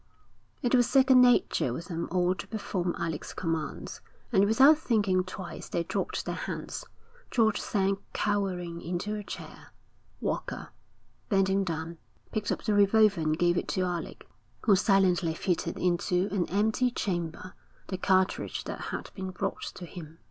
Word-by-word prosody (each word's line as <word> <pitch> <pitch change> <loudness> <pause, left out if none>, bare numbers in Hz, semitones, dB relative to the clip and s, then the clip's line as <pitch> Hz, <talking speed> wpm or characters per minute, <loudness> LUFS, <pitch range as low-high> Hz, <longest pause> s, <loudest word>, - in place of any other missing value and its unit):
It 245 - +1
was 245 -2 +4
second 265 -2 +6
nature 245 - +4
with 165 +7 -5
them 170 -1 -3
all 180 0 +2
to 185 +1 -8
perform 185 -5 -2
Alec's 165 -1 -4
commands, 165 -3 -3 0.3
and 200 -3 +5
without 270 +8 +6
thinking 205 -10 +2
twice 185 0 -8
they 170 - -1
dropped - - -3
their - - -2
hands. - - -5 0.5
George 220 -4 +2
sank 195 -1 0
cowering 185 -5 -1
into 180 +5 -3
a 210 -1 -4
chair. - - -9 0.5
Walker, - - -3 0.6
bending 195 -1 +3
down, 165 -1 -4 0.3
picked 210 -2 -2
up - - -2
the 215 - +1
revolver 205 -2 +4
and 155 0 +1
gave 175 0 +2
it - - -1
to 185 - 0
Alec, 175 -2 -4 0.3
who 205 - +5
silently 185 -4 +3
fitted 170 -1 -1
into 180 +1 +1
an 190 -3 0
empty 220 +6 +2
chamber 180 -5 -3 0.4
the 185 - -2
cartridge 190 -1 +1
that - - -6
had - - -5
been 190 -1 -5
brought 185 - -3
to 180 - -7
him. 165 -2 -10
190 Hz, 155 wpm, -29 LUFS, 175-210 Hz, 0.6 s, second